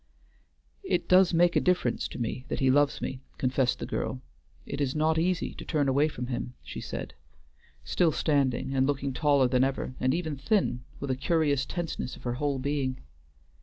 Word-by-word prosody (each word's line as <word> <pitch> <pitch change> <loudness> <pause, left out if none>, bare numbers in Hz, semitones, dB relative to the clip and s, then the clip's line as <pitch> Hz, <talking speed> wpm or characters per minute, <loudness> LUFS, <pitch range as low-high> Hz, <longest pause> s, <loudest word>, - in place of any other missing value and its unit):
"It - - 0
does 185 0 +6
make 175 0 +4
a - - +4
difference 180 -10 +1
to - - -9
me 120 +1 -3
that - - -3
he 130 -1 +4
loves 145 +1 +2
me," 130 0 -4 0.2
confessed 130 -1 +1
the - - -5
girl. 130 - -3 0.5
"It 140 - -4
is 140 0 0
not 160 +1 +2
easy 180 +1 0
to - - -9
turn 150 -4 0
away 140 +3 +3
from 125 -5 -5
him," 125 0 -4
she - - -7
said, - - -6 0.7
still 170 -3 +2
standing, 135 -4 +1
and 135 0 +2
looking 140 -1 -1
taller 140 -2 +3
than 125 0 +3
ever, 135 -1 -1
and 130 - +2
even 160 -4 -3
thin, 135 - +1 0.2
with 140 -1 -2
a - - +1
curious 145 -1 +1
tenseness 165 -7 -4
of - - -15
her 120 - -1
whole 140 +2 -1
being. 130 -1 -1
140 Hz, 190 wpm, -28 LUFS, 130-155 Hz, 0.7 s, does